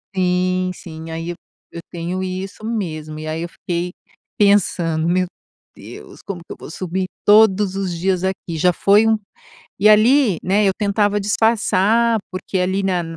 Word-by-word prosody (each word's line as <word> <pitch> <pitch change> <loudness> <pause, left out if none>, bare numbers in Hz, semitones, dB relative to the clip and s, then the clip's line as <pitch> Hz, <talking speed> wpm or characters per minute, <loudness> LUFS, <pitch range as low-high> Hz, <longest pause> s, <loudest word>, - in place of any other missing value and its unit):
Sim, 185 0 +1
sim. 160 -2 -10
Ai, 165 +1 -4
eu - - -7 0.4
eu 170 - -5
tenho 175 +2 -4
isso 190 +3 -5
mesmo. 155 -9 -4
E 155 0 -7
aí 160 +1 -3
eu 170 - -4
fiquei 175 +1 -4 0.5
pensando: 170 -5 +2
"Meu 180 +1 +2 0.5
Deus, - - -12
como 185 -4 -6
que - - -6
eu - - -15
vou - - -10
subir 185 +2 -3 0.2
todos 205 -2 +5
os 185 -3 -3
dias 185 +1 0
aqui? 190 -3 -3
Já 180 +3 +3
foi 205 +5 +4
um". 220 -1 +3 0.6
E 210 - +5
ali, 215 - +5
né, 200 +3 +2
eu 195 - +4
tentava 205 0 +1
disfarçar, 220 +1 +2
porque 185 +1 -4
ali 190 +2 0
na 180 -2 0
185 Hz, 165 wpm, -19 LUFS, 175-205 Hz, 0.6 s, todos